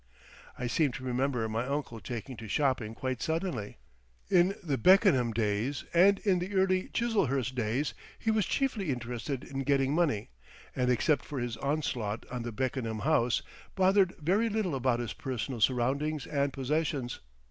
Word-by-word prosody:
I 125 - -3
seem 140 +3 +2
to 130 - -7
remember 125 -2 0
my 115 +3 -2
uncle 140 -5 -3
taking 125 +3 -6
to 110 - -8
shopping 125 -3 0
quite 130 -1 -3
suddenly. 160 - -2 0.5
In 185 +2 +4
the 150 -5 0
Beckenham 180 - +5
days 110 +5 -1
and 195 +4 +6
in 190 -3 +3
the 190 +3 -4
early 185 -1 +2
Chiselhurst 140 - 0
days 125 +3 -1 0.2
he 225 - 0
was 215 -3 +1
chiefly 235 - 0
interested 125 +1 -3
in 135 - -6
getting 135 0 +2
money, 150 -11 +1 0.5
and 125 -1 +1
except 130 +3 +2
for 145 - -6
his 120 -2 -2
onslaught 130 -7 -2
on 125 -1 -3
the 120 0 -4
Beckenham 115 -2 -2
house, 125 -5 +2 0.3
bothered 190 -1 +4
very 195 +9 +1
little 210 -6 -1
about 130 -2 +1
his 120 -2 -3
personal 125 -2 -4
surroundings 135 +5 +1
and 140 -1 0
possessions. 135 -2 -1
135 Hz, 160 wpm, -30 LUFS, 120-170 Hz, 0.5 s, and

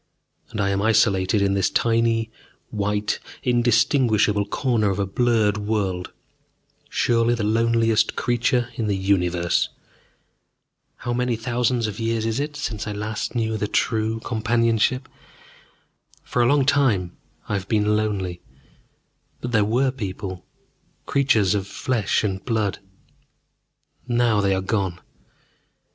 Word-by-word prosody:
And 105 - -6
I 100 -1 +1
am 100 0 0
isolated 105 -2 +3
in 100 0 +2
this 100 -2 +1
tiny 115 -1 +1 0.4
white, 105 0 -1 0.2
indistinguishable 120 -3 +2
corner 115 -3 +1
of 95 - -1
a 100 - 0
blurred 110 0 +1
world, 100 -4 -2 0.8
surely 120 0 +2
the 115 - -3
loneliest 115 0 +2
creature 120 0 0
in 115 -1 -3
the 100 - +1
universe. 90 -3 +1 1.3
How 120 - -4
many 125 0 0
thousands 120 +1 0
of 105 0 -4
years 115 -1 -1
is 115 +2 -1
it 150 +1 -3
since 110 -8 -4
I 105 - -3
last 105 +3 -4
knew 110 -2 0
the 105 0 -2
true 110 0 0
companionship? 115 +2 +1 1.2
For 125 - -1
a 120 - +4
long 140 +1 +3
time 110 -11 +2 0.3
I - - -3
have 100 -1 -2
been 105 -1 +2
lonely, 95 -5 -2 1.0
but 125 - -5
there 110 -3 +3
were 125 +6 +1
people, 95 -6 -6 0.6
creatures 120 -9 +2
of 100 -2 -2
flesh 110 -1 -1
and 95 -2 -2
blood. 110 -5 -1 1.3
Now 120 -3 +2
they 100 -1 +2
are 95 - -1
gone. 95 -4 -1
110 Hz, 130 wpm, -23 LUFS, 100-120 Hz, 1.3 s, a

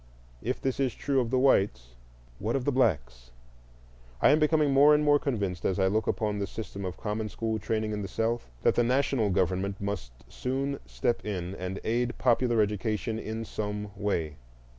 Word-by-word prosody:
If 125 +4 -2
this 130 0 -2
is 130 -5 0
true 140 -2 0
of 120 -3 0
the 130 - +1
whites, 95 - +2 0.5
what 110 +5 -1
of 130 -2 -1
the 145 - +2
blacks? 65 - 0 0.9
I - - +6
am 150 - +4
becoming 150 -2 +3
more 145 +2 +7
and 150 - +2
more 145 -1 +5
convinced, 100 -11 -2
as 95 - 0
I 95 - +3
look 105 +2 +1
upon 105 -2 -1
the 100 - -2
system 100 -3 -6
of 90 0 -5
common 105 0 -3
school 110 0 -2
training 110 +1 -1
in 105 -1 -3
the 100 - -4
South, 115 - -2
that - - +4
the 120 - +2
national 125 -3 +2
government 95 +1 0
must 100 -11 -4 0.2
soon 135 - -2
step 120 - -1
in 95 -3 -4
and 95 0 -5
aid 120 +2 0
popular 120 -2 +3
education 105 +1 -2
in 110 +1 -4
some 105 -1 -4
way. 85 -7 -2
110 Hz, 185 wpm, -28 LUFS, 100-125 Hz, 0.9 s, more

